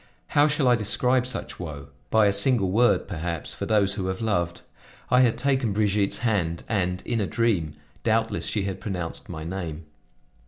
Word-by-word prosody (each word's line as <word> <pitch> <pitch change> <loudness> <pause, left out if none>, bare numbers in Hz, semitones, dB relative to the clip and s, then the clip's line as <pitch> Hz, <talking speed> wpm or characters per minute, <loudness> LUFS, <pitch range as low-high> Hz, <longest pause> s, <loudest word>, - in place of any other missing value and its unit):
How 145 +1 +4
shall 145 -3 +1
I 125 - +6
describe 125 +3 +1
such 130 - -3
woe? 75 -5 -7 0.2
By 110 -1 +4
a 100 - +3
single 100 -2 +3
word, 120 +5 +3
perhaps, 85 -3 -3
for - - -5
those 100 -2 +2
who 95 -2 -3
have 95 0 -3
loved. 85 -6 -1 0.5
I 125 0 +6
had 120 -3 +3
taken 130 -6 +1
Brigitte's 100 -1 +1
hand, 85 -7 0
and, 90 -4 -1
in 115 -2 0
a 100 - -1
dream, 95 -10 0 0.3
doubtless, 115 0 +1
she 105 - -1
had 95 -1 -3
pronounced 90 -5 -5
my 80 - -6
name. 85 -2 -5
100 Hz, 180 wpm, -25 LUFS, 90-115 Hz, 0.5 s, I